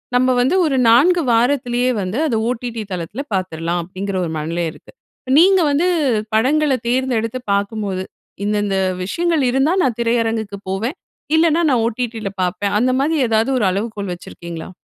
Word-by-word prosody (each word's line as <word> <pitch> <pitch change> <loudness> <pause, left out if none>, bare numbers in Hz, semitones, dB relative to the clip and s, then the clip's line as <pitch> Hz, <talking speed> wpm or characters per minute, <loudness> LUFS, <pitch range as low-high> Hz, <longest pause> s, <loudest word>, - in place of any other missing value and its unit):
நம்ம 255 +1 +3
வந்து 265 +9 +2
ஒரு 280 -4 +1
4 335 +10 +5
வாரத்துலேயே 245 +1 +2
வந்து, 185 +4 -3
அத 240 - 0
ஓடிடி 235 -2 -4
தளத்துல 185 - -4
பார்த்துறலாம், 175 -2 -2
அப்படிங்கிற 190 +2 -5
ஒரு 165 - -4
மனநிலை 165 +3 -2
இருக்கு. - - -17 0.5
நீங்க 380 +2 +5
வந்து 305 +6 +2 0.5
படங்கள 285 +5 +2
தேர்ந்தெடுத்து 245 -1 0
பாக்கும்போது, 200 -2 -2 0.4
இந்தந்த 205 -1 0 0.3
விஷயங்கள் 335 - 0
இருந்தா 270 +6 +2
நான் 245 -4 0
திரையரங்குக்கு 225 -3 -1
போவேன். 225 - -2 0.4
இல்லனா, 325 +1 +3
நான் 245 -4 +2
ஓடிடில 230 -2 -3
பாப்பேன். 200 +3 -1
அந்த 255 +3 +2
மாதிரி 315 +3 +1
ஏதாவது, 225 +2 +2
ஒரு 210 - +1
அளவுகோல் 200 -1 -3
வச்சுருக்கீங்களா? 170 -1 -9
230 Hz, 140 wpm, -19 LUFS, 200-260 Hz, 0.5 s, 4